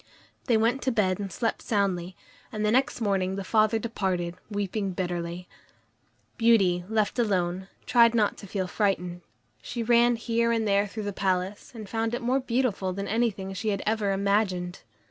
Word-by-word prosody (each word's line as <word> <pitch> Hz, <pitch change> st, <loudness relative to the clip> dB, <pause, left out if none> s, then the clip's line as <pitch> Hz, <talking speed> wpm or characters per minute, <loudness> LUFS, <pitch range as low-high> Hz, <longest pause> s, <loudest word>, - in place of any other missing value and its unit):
They 235 Hz, -4 st, +3 dB
went 235 Hz, +4 st, +1 dB
to 260 Hz, -, +1 dB
bed 195 Hz, -5 st, +1 dB
and 200 Hz, -2 st, -4 dB
slept 225 Hz, +5 st, -2 dB
soundly, 190 Hz, -4 st, -1 dB, 0.4 s
and 215 Hz, 0 st, -2 dB
the 210 Hz, -, +2 dB
next 255 Hz, 0 st, +1 dB
morning 190 Hz, -3 st, 0 dB
the 195 Hz, -, -4 dB
father 215 Hz, +2 st, +3 dB
departed, 190 Hz, -6 st, -2 dB, 0.2 s
weeping 205 Hz, -1 st, -2 dB
bitterly. 175 Hz, -1 st, -4 dB, 0.9 s
Beauty, 195 Hz, -7 st, +4 dB
left 220 Hz, +1 st, 0 dB
alone, 190 Hz, -4 st, 0 dB, 0.2 s
tried 235 Hz, -1 st, +5 dB
not 210 Hz, -3 st, +2 dB
to 200 Hz, -, -10 dB
feel 190 Hz, 0 st, -2 dB
frightened. 180 Hz, -3 st, -1 dB, 0.4 s
She 235 Hz, -, -4 dB
ran 240 Hz, +1 st, +4 dB
here 230 Hz, 0 st, 0 dB
and 225 Hz, -2 st, +1 dB
there 200 Hz, 0 st, +3 dB
through 215 Hz, +2 st, -6 dB
the 205 Hz, 0 st, -3 dB
palace, 190 Hz, +1 st, -1 dB
and 215 Hz, -3 st, -7 dB
found 225 Hz, +2 st, -1 dB
it -, -, -4 dB
more 255 Hz, +3 st, +2 dB
beautiful 235 Hz, -7 st, -1 dB
than 200 Hz, +1 st, -4 dB
anything 205 Hz, -4 st, -1 dB
she 215 Hz, +3 st, -2 dB
had 200 Hz, -2 st, -1 dB
ever 215 Hz, -2 st, +1 dB
imagined. 195 Hz, -3 st, 0 dB
205 Hz, 170 wpm, -27 LUFS, 190-230 Hz, 0.9 s, tried